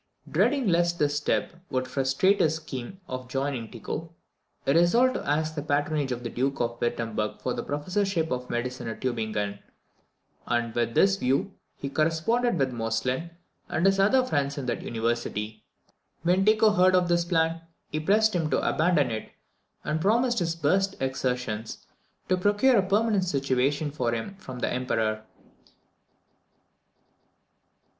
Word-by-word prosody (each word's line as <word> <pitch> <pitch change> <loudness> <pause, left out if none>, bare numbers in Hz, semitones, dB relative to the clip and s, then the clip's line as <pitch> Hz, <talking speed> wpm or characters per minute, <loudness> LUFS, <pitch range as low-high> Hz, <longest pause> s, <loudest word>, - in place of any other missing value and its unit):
Dreading 240 - +2
lest 170 -1 +2
this 145 -2 +1
step 150 - 0 0.2
would 130 0 -1
frustrate 135 +10 +2
his 160 0 +3
scheme 155 +2 -7
of 130 0 -5
joining 135 -3 -2
Tycho, 155 +7 -6 0.5
he 140 - +3
resolved 230 - +4
to 140 - -4
ask 155 +2 +1
the 150 - -3
patronage 145 -1 0
of 125 0 -3
the 120 - -3
Duke 135 +2 -1
of 120 0 -2
Wirtemberg 115 -3 -2
for 125 - -2
the - - -3
professorship 170 +3 -1
of 125 0 -3
medicine 120 0 -3
at 115 - -5
Tubingen; 110 -5 -2 0.9
and 120 -1 0
with 120 -1 -1
this 195 0 +4
view 185 +6 0 0.2
he 140 - -5
corresponded 165 - +1
with 135 -3 0
Moestlin 120 +7 -1 0.4
and 165 - 0
his 195 0 +4
other 255 +7 +4
friends 140 - -1
in 140 - -3
that 120 -2 -2
University. 115 -2 -3 0.6
When 180 +3 +3
Tycho 215 0 +5
heard 185 -1 +4
of 180 -1 +3
this 170 0 +2
plan, 165 -1 +1 0.3
he 155 - -1
pressed 215 +7 +3
him 165 -3 0
to 135 - +1
abandon 155 -6 +2
it, 110 -1 -4 0.5
and 155 +1 -1
promised 235 +5 +2
his 165 -2 -1
best 190 +5 +1
exertions 125 -4 -3 0.4
to 185 - +2
procure 205 +7 +3
a - - +5
permanent 205 -1 +2
situation 140 -1 0
for 120 -5 -1
him 115 - -5
from 130 -9 -9
the - - 0
Emperor. 110 -4 -1
145 Hz, 150 wpm, -27 LUFS, 125-185 Hz, 0.9 s, Tycho